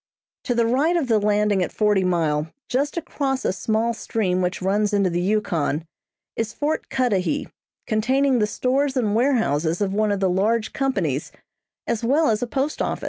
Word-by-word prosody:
To 245 - 0
the 235 -1 +3
right 285 +9 +2
of 285 -7 -1
the 220 -2 +4
landing 210 -1 +2
at 180 - -1
Forty 210 -3 +2
Mile, 160 -4 0 0.2
just 280 +6 -1
across 275 -5 -2
a - - +1
small 220 +4 0
stream 195 -5 -1
which 180 +1 -1
runs 205 +3 0
into 200 -3 +2
the 175 +1 0
Yukon, 175 -6 0 0.5
is 225 0 -2
Fort 300 +2 -2
Cudahy, 250 +1 0 0.4
containing 255 +4 +2
the 210 - +2
stores 265 +5 0
and 215 -5 +1
warehouses 210 - +1
of 200 -2 -1
one 215 0 +1
of 200 - 0
the 190 - +2
large 215 +5 0
companies, 185 - -1 0.5
as 230 0 -2
well 280 +3 +3
as 215 - -1
a 245 - -1
post 275 +5 -2
office. - - -1
215 Hz, 180 wpm, -23 LUFS, 190-255 Hz, 0.5 s, the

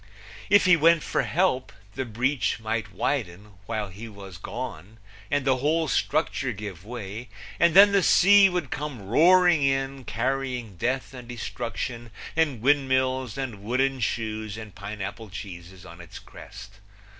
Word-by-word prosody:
If 205 -2 +5
he 185 -1 +7
went 165 0 +4
for - - 0
help 165 -8 0 0.2
the 130 - -3
breach 120 +3 -1
might 110 -3 -3
widen 105 -7 -3
while 110 -3 -3
he 105 +5 -9
was 95 -4 -11
gone 110 -3 -7 0.3
and 145 -2 0
the 130 -2 +3
whole 155 +5 +1
structure 140 -2 0
give 100 -4 -8
way, 115 0 -7 0.3
and 170 0 +4
then 200 +1 +9
the 200 -1 +4
sea 200 +2 +6
would 175 -7 -3
come 140 -7 -5
roaring 175 - +5
in, 135 0 0
carrying 125 -2 -2
death 130 +8 -2
and 125 -2 -10
destruction 120 0 -5 0.3
and 150 -8 +1
windmills 130 -3 +1
and 120 -7 -5
wooden 130 +5 0
shoes 110 -2 -3
and 110 -3 -9
pineapple 100 +3 -7
cheeses 90 -1 -9
on 85 -1 -12
its 85 - -11
crest. 100 +2 -12
125 Hz, 145 wpm, -25 LUFS, 105-140 Hz, 0.3 s, then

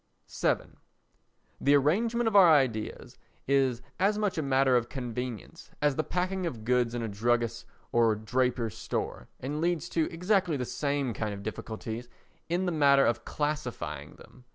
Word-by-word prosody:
vii - - +1 1.0
The 140 +1 +4
arrangement 225 - +2
of 220 - 0
our 190 -4 +9
ideas 130 -8 0 0.3
is 135 -3 +2 0.2
as 200 +3 +3
much 210 -3 0
a 160 - 0
matter 135 -2 +3
of 120 -1 +1
convenience 125 -3 -6
as 145 -2 +2
the 155 - 0
packing 185 +1 -1
of 115 -9 -6
goods 125 -1 +2
in 120 - -2
a - - -2
druggist's 115 +2 0 0.3
or 115 -2 +4
draper's 120 0 -1
store - - -4
and 145 +4 -3
leads 175 -1 0
to 160 -2 0
exactly 180 -2 +1
the 125 - -2
same 140 -2 -1
kind 105 -1 -3
of 100 - -9
difficulties 110 +2 -6 0.4
in 175 +2 0
the 180 - 0
matter 140 -3 +5
of 115 0 0
classifying 125 - -3
them. 125 -1 -17
130 Hz, 160 wpm, -29 LUFS, 115-160 Hz, 1.0 s, our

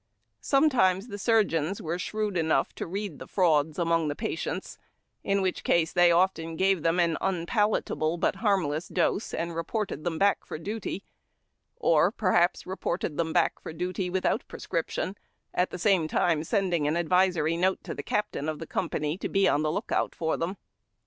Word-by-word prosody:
Sometimes 250 -8 +3
the 205 - -6
surgeons 195 -6 +1
were 170 +3 -3
shrewd 210 +1 -2
enough 160 -5 +1
to - - -5
read 195 -2 -4
the - - -9
frauds 155 -5 +2
among 165 -2 +1
the 145 - -2
patients, - - -4 0.4
in 195 0 +1
which 185 - -1
case 165 -1 +2
tliey 175 -1 +5
often 170 -2 +1
gave 190 0 +2
them 165 +3 +1
an 170 -2 +2
unpalatable 175 - 0
but 180 - 0
harmless 180 -7 0
dose, 210 - 0
and 170 0 -3
reported 165 -1 -3
them 170 -2 -2
back 200 +3 +2
for - - -6
duty, 200 +2 -5 0.7
or, 160 +1 +3
perhaps, 185 -5 +2
reported 175 -4 -3
them 165 -1 0
back 170 0 +2
for - - -7
duty 180 +2 -3
tvithout 185 +1 0
prescription, 170 +3 -3 0.4
at 180 - +1
the - - -6
same 180 -3 +2
time 155 -1 +1
sending 175 -5 0
an 150 - +1
advisory 175 -1 +2
note 185 +3 +1
to - - -5
the - - -5
captain 210 -8 -2
of 155 - -3
the 165 - -7
company 150 +2 -2
to - - -3
be 195 -1 +3
on 150 - +2
the 155 0 0
lookout 200 - -1
for 160 -1 0
them. 180 +4 -3
175 Hz, 175 wpm, -27 LUFS, 160-195 Hz, 0.7 s, tliey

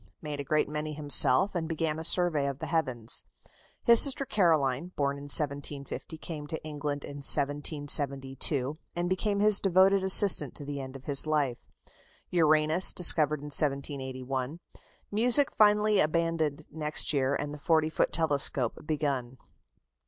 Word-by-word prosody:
Made 150 -2 -8
a - - -4
great 155 +2 -1
many 150 +1 -6
himself, 145 +3 +3
and 170 -3 -4
began 160 -1 -3
a - - -7
survey 165 -4 +2
of 140 -1 -5
the - - -7
heavens. 130 -9 -2 0.6
His 235 -1 +5
sister 275 -1 +5
Caroline, 160 - 0
born 140 -1 -2
in 140 - -11
1750, 145 +1 -3
came 155 -2 -9
to 160 - -7
England 145 -2 -6
in 145 - -9
1772, 140 -1 -1 0.2
and 175 0 -3
became 200 +2 -2
his 210 -1 +5
devoted 195 +1 +2
assistant 190 - +6
to 145 - -9
the 140 -1 -6
end 130 0 -10
of 130 - -13
his 145 +1 +2
life. 145 -6 -2 0.7
Uranus 155 +1 +2
discovered 150 -4 +5
in 145 0 -10
1781. 135 0 -4 0.5
Music 245 +6 +2
finally 210 0 +2
abandoned 155 -2 -2
next 150 0 -2
year, 135 -1 -1
and 145 +1 -5
the 150 - -10
40 160 +1 0
foot - - -1
telescope 140 -6 0
begun. 140 -5 -4
150 Hz, 145 wpm, -27 LUFS, 140-165 Hz, 0.7 s, assistant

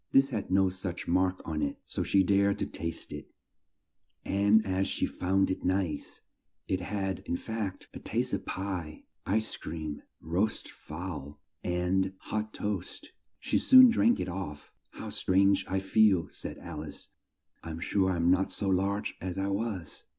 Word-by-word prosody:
This 135 0 +5
had 110 -6 -3
no 95 +1 +4
such 95 -1 -5
mark 90 +1 +2
on 80 -2 -2
it, 70 -1 -1
so - - -3
she 95 -1 +3
dared 100 +1 +3
to - - -1
taste 85 -1 -5
it, - - -8 1.0
and 100 +2 +4
as 95 0 0
she - - 0
found 95 +1 +1
it 95 - -3
nice 95 -3 -1 0.4
(it 95 - 0
had, 95 0 -2
in 85 - 0
fact, 110 -3 -4
a - - -7
taste - - -2
of - - -1
pie, 90 -5 -4 0.2
ice 110 +3 0
cream, 80 -2 -5 0.2
roast 95 +7 -1
fowl, 75 -3 -7 0.2
and 90 +2 +1
hot 110 +2 -3
toast), 105 -4 -4 0.3
she - - +1
soon 260 -1 +9
drank 235 +1 +3
it - - -2
off. 85 -5 -6 0.2
"How - - -7
strange 100 +1 +3
I 95 - 0
feel," 95 -2 +4
said - - -7
Al 75 -3 -7
ice. 75 - -10 0.5
"I 80 - -8
am 80 0 -5
sure 95 +2 +1
I 90 - +1
am 85 +1 +3
not 95 +1 +2
so 100 - -1
large 100 +2 0
as 90 0 -4
I 95 +1 0
was!" 100 -4 -3
95 Hz, 170 wpm, -30 LUFS, 90-100 Hz, 1.0 s, soon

